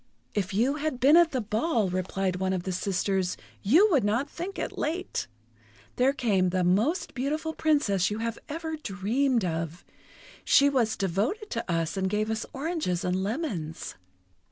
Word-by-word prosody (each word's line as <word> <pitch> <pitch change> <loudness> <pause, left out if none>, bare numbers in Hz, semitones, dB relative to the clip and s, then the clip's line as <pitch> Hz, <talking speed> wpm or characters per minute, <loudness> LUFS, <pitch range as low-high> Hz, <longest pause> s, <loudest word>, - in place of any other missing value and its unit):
"If 190 -3 -1
you 245 +9 +1
had 305 -4 -2
been 280 +5 +6
at 340 -1 +6
the 260 -4 -1
ball," 215 - 0
replied 185 0 -1
one 190 0 0
of 180 -2 -2
the 190 - -3
sisters, 190 0 -1 0.2
"you 320 - +5
would 280 - +4
not 230 +7 +1
think 350 +6 -6
it - - -3
late! 345 +5 -2 0.7
There 255 +2 +4
came 205 -9 +1
the 185 0 0
most 210 - +1
beautiful 305 +5 -2
Princess 250 - +2
you 210 - -3
have 230 0 -3
ever 320 +1 -4
dreamed 235 0 0
of. 165 0 -3 0.6
She 280 0 +5
was 235 -5 +1
devoted 215 - -1
to 230 -6 -3
us, 165 +2 -1
and 190 0 0
gave 215 +2 0
us 220 0 -3
oranges 285 - -2
and 180 +1 0
lemons." 195 - -3
220 Hz, 165 wpm, -27 LUFS, 190-290 Hz, 0.7 s, been